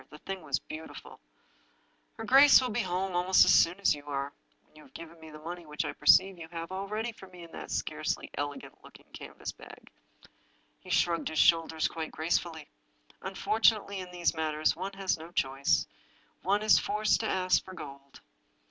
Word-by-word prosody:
The 150 - -12
thing 190 +4 -7
was 140 -4 -1
beautiful! 160 +1 -10 0.5
" - - -40
Her 225 - -6
gjace 270 +4 +8
will 255 -3 -2
be 230 - -1
home 185 -1 -2
almost 180 +1 +5
as - - +5
soon 175 +3 +4
as 200 - +3
you 145 0 -10
are 140 0 -3 0.2
— - - -40
when - - -33
you 155 - -15
have - - -20
given 165 0 -11
me 160 0 -12
the 155 - -11
money 170 +3 -8
which 150 -1 -4
I - - -4
perceive 190 -1 +4
you 165 - -8
have 165 +1 -7
all 190 +1 -4
ready 220 +3 -3
for 195 -4 -14
me 180 -2 -13
in 165 - -13
that - - -9
scarcely - - -3
elegant 145 0 -6
looking - - -16
can - - -10
vas - - -6
bag." - - -15 0.9
He 185 - -15
shrugged 170 -1 +1
his 160 - -6
shoulders 160 -1 +3
quite 160 -1 -5
gracefully. 160 -1 -2 0.3
" - - -30
Unfortunately, 200 +1 +1
in 185 -1 -7
these 175 -1 0
matters 155 -1 0
one 190 +3 -5
has 195 -3 -1
no 165 +2 -10
choice— 135 -3 +1 0.6
one 200 +3 +1
is 215 - +6
forced 215 0 +1
to 220 - -2
ask 185 -1 +1
for 185 - -11
gold." 140 -4 -11
170 Hz, 200 wpm, -29 LUFS, 155-190 Hz, 0.9 s, gjace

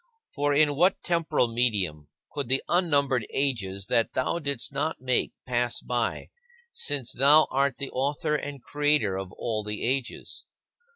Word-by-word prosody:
For 145 0 +1
in 145 0 +3
what 180 +6 +2
temporal 160 -9 +1
medium 95 -11 0 0.2
could 140 -5 -4
the 135 +1 +2
unnumbered 140 - +1
ages 100 -9 -1
that 115 +2 +1
thou 130 +6 0
didst 140 -6 -3
not 155 +3 -2
make 130 -1 0
pass 120 -1 0
by, 120 -1 -2 0.4
since 140 -5 0
thou 145 +4 +6
art 140 0 +1
the 140 - -4
Author 140 +3 -1
and 145 -3 -5
Creator 145 -9 +1
of 95 -1 -7
all 110 -2 -3
the 105 0 -4
ages? 130 0 -3
135 Hz, 150 wpm, -27 LUFS, 115-145 Hz, 0.4 s, thou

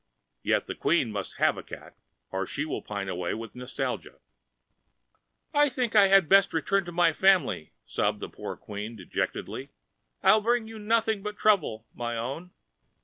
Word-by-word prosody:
Yet - - +1
the - - -4
Queen 140 -9 +1
must 100 -3 -5
have - - +3
a - - -5
cat - - -11 0.4
or 95 0 -2
she 150 - -2
will 155 - -3
pine 100 -2 -4
quite - - -6
away 90 0 -2
with 115 -1 -8
nostalgia." 125 +1 -4 1.4
"I 290 0 +5
think 250 -3 -2
I 200 -2 +8
had 195 -3 +5
best 195 +2 +5
return 195 +4 +1
to 175 - -6
my 170 -1 +3
family," 180 - +2
sobbed - - 0
the - - -5
poor - - -7
Queen, 105 +2 -7
dejectedly. 95 -5 -4 0.5
"I 215 - +7
bring 235 +1 +1
you 225 0 -9
nothing 220 -1 +1
but 210 +1 -5
trouble, 160 - +2
my 120 -1 -3
own." 135 +10 -4
170 Hz, 170 wpm, -28 LUFS, -, 1.4 s, I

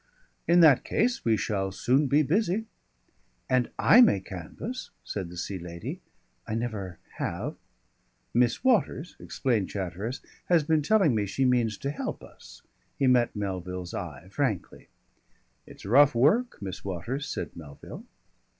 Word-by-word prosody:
"In 175 +1 +6
that 150 -6 +6
case 245 0 0
we 115 -2 +3
shall 95 -1 -1
soon 130 +9 +2
be 145 +3 +4
busy." 200 +7 +1 0.8
"And 130 -2 +2
I 245 - +7
may 225 - +5
canvass," 95 - -7
said 95 -4 -5
the 90 - -10
Sea 95 +2 -4
Lady. 85 0 -7 0.5
"I 110 - -2
never 105 -7 -4 0.2
have - - -3 0.4
" - - -43
"Miss 120 - +2
Waters," 210 - +1
explained 115 -8 -1
Chatteris, 100 +6 -4 0.2
"has 170 -3 +3
been 155 0 +2
telling 190 - +3
me 105 -2 0
she 130 +7 0
means 120 -5 +2
to 140 - -3
help - - -5
us." - - -15 0.3
He 135 - +1
met 125 -3 +3
Melville's 90 -3 -4
eye - - -6
frankly. - - -3 0.8
"It's - - -13
rough 135 +5 +5
work, 205 - +3
Miss 95 -1 -6
Waters," 115 - -4
said - - -5
Melville. 75 -4 -10
120 Hz, 145 wpm, -27 LUFS, 95-150 Hz, 0.8 s, I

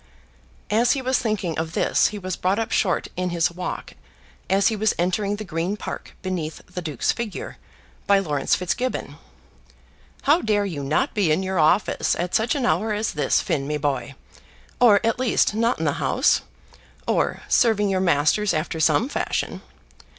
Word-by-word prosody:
As 235 +3 +4
he 275 - -2
was 260 0 +1
thinking 195 -8 -2
of 160 0 -3
this - - +2
he 210 - -5
was 185 -3 -4
brought 185 +2 0
up 225 0 -2
short 185 -4 +1
in 180 0 -1
his 170 -1 +1
walk 180 +1 -6 0.6
as 195 +2 +4
he 225 - -2
was 215 0 +1
entering 195 +4 0
the 215 - -6
Green 175 +2 -2
Park - - -7
beneath 175 -4 -3
the 180 - -7
Duke's 155 -6 -1
figure, 235 -3 -5 0.5
by 200 - +5
Laurence 150 -8 +1
Fitzgibbon. 245 +8 -3 1.1
"How 300 +5 +4
dare 205 -2 +1
you 160 -8 -4
not 145 +3 0
be 195 -7 +2
in 170 +5 +1
your 190 -1 -1
office 155 +6 +2
at 175 +1 -3
such 225 +4 +2
an 270 -4 -1
hour 205 +8 +1
as 210 0 -1
this, 150 -3 +1
Finn, 135 -1 -2
me 150 0 -1
boy, 140 -3 -2 0.6
or, 215 -5 +6
at 230 +2 +1
least, 255 -4 +2
not 230 +3 +1
in - - -2
the - - +2
House, - - +2 0.7
or - - 0
serving 220 -4 +3
your 190 -1 +1
masters 175 +3 +2
after 155 +1 -2
some 160 - +3
fashion?" - - -2
190 Hz, 175 wpm, -23 LUFS, 160-215 Hz, 1.1 s, or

